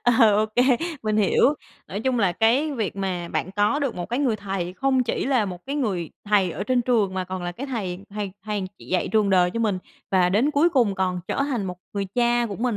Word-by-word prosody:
Ờ, 230 -4 +5
OK, 215 0 0 0.5
mình 215 -1 0
hiểu, 215 +7 +4 0.3
nói 200 - -4
chung 250 0 0
là 190 -5 +2
cái 245 - +2
việc 220 -7 -3
mà 180 -3 -3
bạn 185 - -2
có 210 +8 +2
được 280 -4 -1
một 175 -1 -4
cái 240 +3 -1
người 255 -6 +1
thầy 195 -3 -4
không 260 +6 +1
chỉ 235 - -2
là 255 -6 +2
một 180 +3 -7
cái 280 +2 -2
người 190 - -1
thầy 200 -3 +3
ở 170 +4 -4
trên 245 +2 +2
trường 220 -6 +1
mà 185 -1 -1
còn 185 0 -5
là 175 0 -3
cái 270 +10 -6
thầy 195 -9 -3
thầy 205 -2 -4
thầy 210 -2 -2 0.2
dạy 185 - -1
trường 215 -3 +2
đời 180 -1 +4
cho 230 +5 -3
mình, 205 -5 +1 0.3
và 185 -2 +4
đến 225 +10 +2
cuối 300 +4 +4
cùng 240 - +2
còn 185 -1 -1
trở - - -1
thành 255 -7 -1
một 180 -2 -5 0.2
người 200 -1 -2
cha 240 -1 +2
của 200 - -6
mình 240 -2 -1
210 Hz, 240 wpm, -24 LUFS, 185-245 Hz, 0.5 s, Ờ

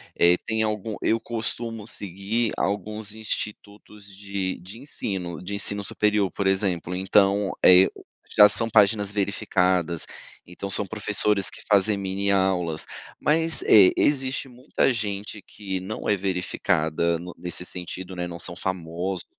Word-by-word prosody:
eh, 85 +1 +5
tem 110 0 -1
algum 110 0 -2
eu 115 - +2
costumo 115 -1 -4
seguir 100 +3 -2
alguns 105 +1 -2
institutos 105 -1 -6
de 100 -1 -4
de 100 +6 -10
ensino, 90 - -5
de 100 - -6
ensino 100 0 -1
superior, 105 -1 +1
por 100 - -2
exemplo, 95 -2 0
então, 100 +1 +2
eh, 90 +1 +8
o - - -13 0.3
já 105 -1 +9
são 115 - +2
páginas 105 -2 +3
verificadas, 90 -4 0 0.4
então 90 +3 -7
são 100 +1 +1
professores 105 -1 +1
que - - -12
fazem 100 +1 +4
mini 100 0 -1
aulas. 90 -5 +1 0.3
Mas, 160 +2 +1
é, 100 -4 +7
existe 135 -1 +1
muita 125 +2 0
gente 105 -2 -4
que 95 -2 -5
não 95 +4 -5
é 105 - +3
verificada 90 -3 0
no 90 +1 -8
nesse 90 +1 -3
sentido, 90 +1 -7
né, 90 -1 -3
não 85 -1 -8
são 85 - 0
famosos 90 0 -3
100 Hz, 140 wpm, -24 LUFS, 90-105 Hz, 0.4 s, já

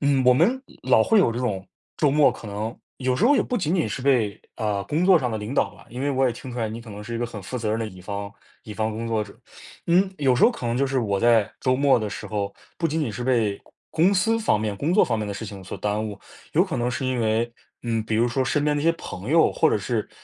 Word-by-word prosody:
嗯， 140 -2 +2
我 125 0 +6
们 225 - +3 0.2
老 - - +4
会 225 - +4
有 190 - +4
这 115 - -3
种， 100 -7 -2 0.3
周 150 - +3
末 150 +1 +5
可 110 - -9
能 105 +3 -4 0.2
有 130 -1 0
时 190 - +1
候 285 +3 +5
也 - - +3
不 250 - -2
仅 165 -6 -1
仅 170 - +1
是 130 - -4
被， 120 -7 +2 0.2
呃， 105 -3 -1
工 165 +5 0
作 190 - +7
上 125 -3 -1
的 110 - -2
领 105 +5 -5
导 100 -6 +1
了， - - -17
因 125 - -6
为 140 +1 0
我 135 -1 +2
也 125 - +1
听 125 +2 -9
出 125 - -5
来 110 -2 -1
你 115 +2 -6
可 115 -2 -11
能 105 +1 -8
是 115 +2 -6
一 115 - -2
个 120 - -1
很 110 -4 -7
负 100 +7 -6
责 110 -3 -2
任 110 - 0
的 115 - -2
乙 95 -3 -11
方 100 +2 -5 0.3
乙 105 -3 -8
方 110 0 -1
工 115 +2 -4
作 110 -2 0
者。 100 -1 -12 0.5
嗯， 185 +3 +3
有 135 -3 +3
时 - - 0
候 - - +7
可 180 - -6
能 115 0 0
就 140 +2 +2
是 135 0 0
我 100 -5 0
在 115 -3 +4
周 130 -1 +2
末 140 -1 +4
的 105 -1 -3
时 - - -6
候， 100 -2 -3 0.3
不 165 - +1
仅 160 +2 -1
仅 120 -8 -2
是 120 - -5
被 115 -5 +1 0.3
公 165 +3 +3
公 200 - +4
司 225 +5 +2
方 105 - +2
面、 105 -2 -2
工 150 - -1
作 - - +5
方 115 - -1
面 105 -1 -3
的 100 - -4
事 105 +2 -6
情 100 -2 -9
所 95 - -7
耽 105 +1 -1
误， 100 -2 -8 0.3
有 - - +4
可 - - -4
能 120 +1 0
是 130 +1 -3
因 130 -2 0
为， 115 +1 0 0.3
嗯， 115 -2 -1
比 110 0 -1
如 115 +2 +3
说 130 +2 0
身 145 +3 0
边 150 0 +2
的 145 - -1
一 - - -3
些 165 - +5
朋 - - -7
友 - - +5
或 - - +3
者 - - +2
是 - - -2
120 Hz, 325 characters per minute, -24 LUFS, 110-140 Hz, 0.5 s, 作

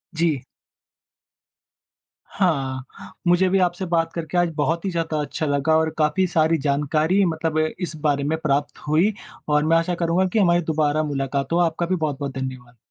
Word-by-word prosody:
जी। 160 -4 +1 2.0
हाँ, 135 -8 -2
मुझे 175 +2 +4
भी 195 - +2
आपसे 180 +1 0
बात 165 -1 +1
करके 170 0 -3
आज 175 -1 +3
बहुत 165 +5 0
ही - - 0
ज़्यादा 165 -2 -2
अच्छा 150 +2 -3
लगा 145 +2 +2
और 160 0 +1
काफ़ी 160 +5 +2
सारी 160 -1 +2
जानकारी 155 +7 +2
मतलब 160 -2 -1
इस 155 +2 -2
बारे 145 -2 +1
में 160 - +1
प्राप्त 145 -1 0
हुई 170 +8 +3 0.3
और 150 0 +2
मैं 165 +1 +4
आशा 170 +2 0
करूँगा 170 +2 +1
कि 225 - +3
हमारी 175 -3 +4
दोबारा 155 0 +1
मुलाक़ात 140 -1 -2
हो। - - +3
आपका 170 0 +1
भी 185 - 0
बहुत-बहुत 145 -4 -3
धन्यवाद। 130 -2 -6
160 Hz, 165 wpm, -22 LUFS, 145-175 Hz, 2.0 s, मुझे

